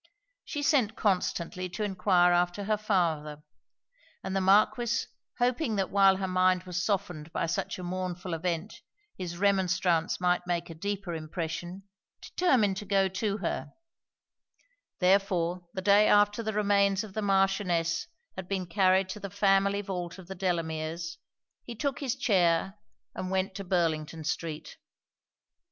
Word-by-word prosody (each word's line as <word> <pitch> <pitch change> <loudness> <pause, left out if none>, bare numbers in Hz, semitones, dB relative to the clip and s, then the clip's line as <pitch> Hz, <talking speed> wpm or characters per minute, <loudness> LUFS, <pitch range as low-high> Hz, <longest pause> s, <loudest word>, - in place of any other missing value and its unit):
She 290 -1 -4
sent 255 -8 +2
constantly 185 -2 -1
to 210 +5 -4
enquire 185 -3 +3
after 175 +3 +1
her 215 +2 +1
father; 165 -8 -1 0.8
and 190 - -3
the 195 - +1
Marquis 215 +4 +3 0.3
hoping 245 -1 +1
that 195 -2 -1
while 195 -1 +5
her 190 0 -2
mind 185 0 +2
was 180 -1 -3
softened 175 -6 -2
by - - -1
such 165 +1 -2
a 180 - -7
mournful 180 0 -4
event 170 +4 -3 0.3
his 175 -2 -6
remonstrance 185 -3 +1
might 180 0 +1
make 175 -1 -2
a - - -6
deeper 195 +1 -4
impression, 165 +3 -5 0.4
determined 235 - +1
to 210 - -6
go 195 -1 +2
to 200 +2 -2
her; 140 -3 -3 1.2
therefore 180 -2 +1
the 190 - -3
day 205 +2 +5
after 205 +2 +4
the 220 -1 -2
remains 200 -1 +2
of 210 -3 -10
the 215 - -2
Marchioness 195 -4 +1 0.3
had 190 - -7
been 190 -2 -2
carried 185 +1 +3
to 200 - -6
the 200 - -6
family 200 0 +2
vault 180 -3 -5
of 190 - -11
the 190 - -7
Delameres, 165 -2 -3 0.5
he 240 - -8
took 280 +4 -2
his 265 -4 -2
chair, 190 -7 +2 0.4
and 185 - -5
went 190 0 -1
to 195 - -6
Burlington 165 -3 -1
street. 155 0 -4
190 Hz, 145 wpm, -29 LUFS, 175-200 Hz, 1.2 s, while